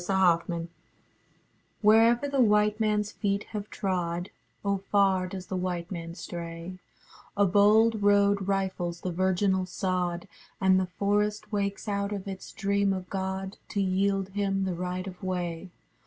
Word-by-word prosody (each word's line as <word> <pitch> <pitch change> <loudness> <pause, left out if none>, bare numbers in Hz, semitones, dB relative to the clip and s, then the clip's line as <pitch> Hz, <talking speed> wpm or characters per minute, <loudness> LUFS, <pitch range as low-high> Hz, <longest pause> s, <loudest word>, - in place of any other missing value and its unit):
THE 190 +2 -1
WHITE 175 -3 +4
MAN 170 -1 -3 1.1
Wherever 230 +5 +5
the 280 -2 +1
white 210 -1 +3
manâs 210 -1 0
feet 200 -1 -1
have 210 -1 -4
trod 175 -2 -2 0.3
(Oh 200 0 +2
far 195 -2 +3
does 185 0 -7
the 190 - -4
white 180 -1 -3
man 165 -2 -6
stray) 170 +1 -7 0.6
A 200 - +5
bold 210 +3 +4
road 200 -1 +3
rifles 185 -3 -1
the 185 - -2
virginal 190 +1 +1
sod, 180 -1 -2 0.3
And 190 -1 +4
the 185 - -1
forest 205 +3 -1
wakes 200 0 -2
out 200 0 -1
of 200 -1 -4
its 195 -1 -7
dream 200 -1 +1
of 185 -1 -6
God, 190 0 -3
To 205 - -2
yield 195 0 +1
him 195 -1 -1
the 185 - -1
right 180 +1 -3
of 185 -1 -9
way. 180 -2 -3
195 Hz, 155 wpm, -28 LUFS, 180-205 Hz, 1.1 s, Wherever